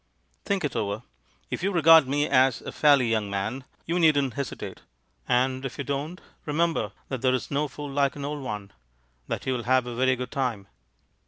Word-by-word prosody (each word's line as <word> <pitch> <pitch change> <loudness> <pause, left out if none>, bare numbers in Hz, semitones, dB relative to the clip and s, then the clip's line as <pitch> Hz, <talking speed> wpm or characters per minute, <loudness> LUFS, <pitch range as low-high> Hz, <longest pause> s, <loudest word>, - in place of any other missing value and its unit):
Think 200 -3 0
it 140 - -3
over. 105 +2 -2 0.5
If - - -3
you 195 +2 0
regard 165 -4 +7
me 145 +2 +1
as 130 -3 +3
a - - -7
fairly 140 -5 +4
young 110 -3 0
man, 105 +7 -3 0.2
you 170 +2 0
needn't 145 -6 +3
hesitate; 140 0 -5 0.5
and 130 +1 +1
if 135 - -5
you 140 - -3
don't, 145 +6 -3 0.3
remember 150 - 0 0.2
that 130 -3 -3
there's 130 -1 0
no 145 +2 0
fool 145 0 -7
like 140 0 +1
an 140 -1 -5
old 145 0 -4
one 105 - -6 0.3
— - - -41
that - - -4
you'll 130 -2 -1
have 130 +1 +2
a 120 - -5
very 130 +2 +2
good 125 0 -6
time." 125 -7 -2
130 Hz, 190 wpm, -26 LUFS, 120-145 Hz, 0.5 s, regard